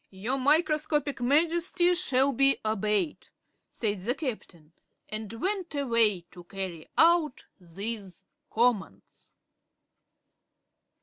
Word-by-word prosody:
"Your 220 +8 -3
Microscopic 300 -1 +1
Majesty 335 +6 +3
shall 275 -6 +2
be 275 +2 +3
obeyed," 215 - -1 0.4
said 210 -3 -2
the 235 +8 -2
Captain, 180 - -7 0.3
and 215 -1 -5
went 365 - -3
away 230 -8 +2
to 175 -1 -12
carry 185 -4 -7
out 325 -4 +3
these 195 +2 -7 0.2
commands. 215 - -2
245 Hz, 95 wpm, -28 LUFS, 200-300 Hz, 0.4 s, Majesty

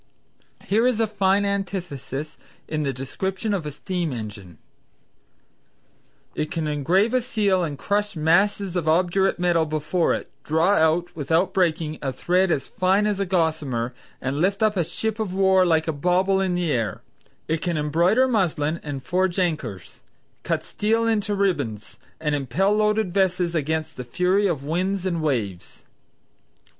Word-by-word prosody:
Here 225 +5 +3
is 245 -3 +1
a 225 - +3
fine 200 -1 +1
antithesis 175 -7 -4 0.3
in 155 -1 -2
the 140 -2 0
description 190 - -3
of 175 -6 -2
a - - -4
steam 175 +1 -3
engine 105 - -7 1.8
"It 155 - -2
can 165 -1 -2
engrave 175 - +1
a 255 - +3
seal 205 -6 +1
and 150 -4 -3
crush 205 +5 -1
masses 185 +4 +2
of 170 -3 -1
obdurate 180 +4 +2
metal 175 -2 +2
before 155 +3 0
it; - - -7
draw 160 +4 +2
out, 175 -1 +2
without 165 +5 +1
breaking, 160 -4 0
a 135 - -1
thread 180 +7 +1
as 140 -5 0
fine 190 +3 +2
as 205 -2 0
a 195 - -1
gossamer; 155 -9 0 0.3
and 135 +3 -2
lift 200 +3 +1
up 215 -1 +3
a 175 - +2
ship 220 +7 -3
of 195 -4 -2
war 190 -1 +4
like 160 -1 +2
a 160 - 0
bauble 185 +5 +2
in 185 -2 0
the 175 -3 0
air; 115 -7 -2 0.4
it 160 0 -1
can 175 -3 -1
embroider 170 - +3
muslin 170 - 0
and 140 -3 -6
forge 185 +2 0
anchors; 155 - -3 0.4
cut - - -1
steel 225 +2 0
into 210 -2 0
ribands, 130 - -2 0.2
and 150 -2 -1
impel 145 - +1
loaded 210 -3 +1
vessels 185 -3 +1
against 160 0 -2
the 125 - -4
fury 180 +11 +1
of 155 -7 -2
winds 185 +5 -1
and 170 -3 -1
waves." 110 - -3
175 Hz, 160 wpm, -23 LUFS, 150-195 Hz, 1.8 s, war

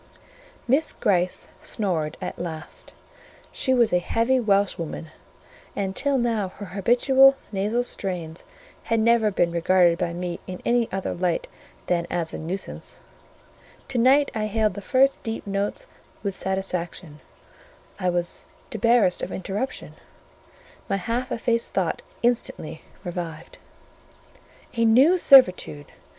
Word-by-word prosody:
Miss 280 +6 +2
Gryce 180 -2 0
snored 165 -8 -2
at - - -6
last; 160 -2 -7 0.6
she 260 - -1
was 240 -5 +3
a 180 - +4
heavy 230 +8 +1
Welshwoman, 195 -7 0 0.6
and 195 -1 -2
till 280 -1 +1
now 230 -5 0
her 205 - -7
habitual 260 +6 +5 0.2
nasal 210 +4 0
strains 180 -8 -5 0.4
had 230 -1 +1
never 225 -1 +4
been 175 -3 +1
regarded 170 0 +3
by 170 - -1
me 175 0 -4
in 180 -1 -6
any 235 -1 +2
other 190 0 -2
light 175 -1 -1 0.4
than 170 -1 0
as 170 -2 -3
a - - -5
nuisance; 180 +5 -6 0.9
to 250 - -1
night 270 +4 +4
I 215 -2 -1
hailed 215 0 +1
the 200 - -7
first 270 +4 +2
deep 225 0 -5
notes 200 - -2 0.4
with 200 -2 -2
satisfaction; 180 -4 -4 0.8
I 185 -2 +1
was 175 0 -2 0.2
debarrassed 225 -3 +3
of 185 - -4
interruption; 200 +7 -4 1.0
my 195 - +1
half 235 +7 -3
effaced 230 0 -1
thought - - -1 0.2
instantly 235 -9 -1 0.2
revived. 170 -3 -6 1.1
"A 230 - 0
new 265 +11 +5
servitude! 185 - +5
200 Hz, 125 wpm, -24 LUFS, 175-235 Hz, 1.1 s, habitual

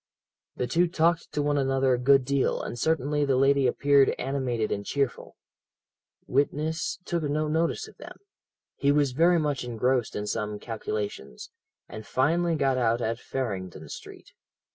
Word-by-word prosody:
"The 125 - -1
two 175 +7 +2
talked 170 0 +1
to 145 - 0
one 145 0 +1
another 135 -1 +2
a 125 - 0
good 135 +1 +4
deal, 140 0 +1
and - - -5
certainly 150 0 +1
the 140 -2 +2
lady 135 0 +3
appeared 140 +2 +3
animated 125 -4 -2
and 100 - -2
cheerful. 140 +2 -2 0.9
Witness 150 +4 -1
took 170 -1 -1
no 150 +1 -1
notice 160 +2 0
of - - -17
them; - - -11 0.6
he 140 - +2
was 145 -2 +2
very 170 +6 +4
much 150 -5 -1
engrossed 125 0 0
in 105 - -3
some 105 0 -3
calculations, 105 - -5 0.4
and 110 - -8
finally 165 +10 +1
got 135 -3 +1
out 115 -1 +2
at 115 0 -2
Farringdon 95 - -5
Street. - - -11
135 Hz, 155 wpm, -27 LUFS, 120-150 Hz, 0.9 s, good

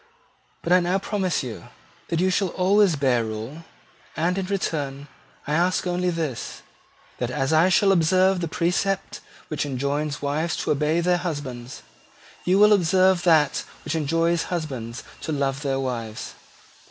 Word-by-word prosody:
But 170 - +2
I 180 - +7
now 180 +2 +1
promise 190 -5 -1
you 120 -3 -7 0.4
that 165 - -1
you 185 +1 +2
shall 195 +1 +1
always 190 0 +3
bear 130 -4 +2
rule: 115 +9 -6 0.5
and, 170 +3 +1
in 190 -1 -2
return, 145 -8 -3 0.4
I 150 - -2
ask 180 +4 +1
only 180 0 0
this, 160 -8 -4 0.6
that, 120 - -1
as 135 +2 -1
I 160 +4 +5
shall 195 +2 +4
observe 185 +1 +3
the 170 - -1
precept 180 +4 -1 0.3
which 155 - -2
enjoins 145 +2 -2
wives 155 +3 -1
to - - 0
obey 150 +3 +1
their 180 +1 +2
husbands, 145 -8 -5 0.6
you 185 +2 +3
will 210 +1 +7
observe 185 0 +3
that 155 -4 +3 0.2
which - - -3
enjoins 165 +2 +1
husbands 130 -9 -4 0.2
to - - -4
love 140 -1 -1
their 135 -2 -1
wives." 115 -4 -4
160 Hz, 155 wpm, -24 LUFS, 140-180 Hz, 0.6 s, I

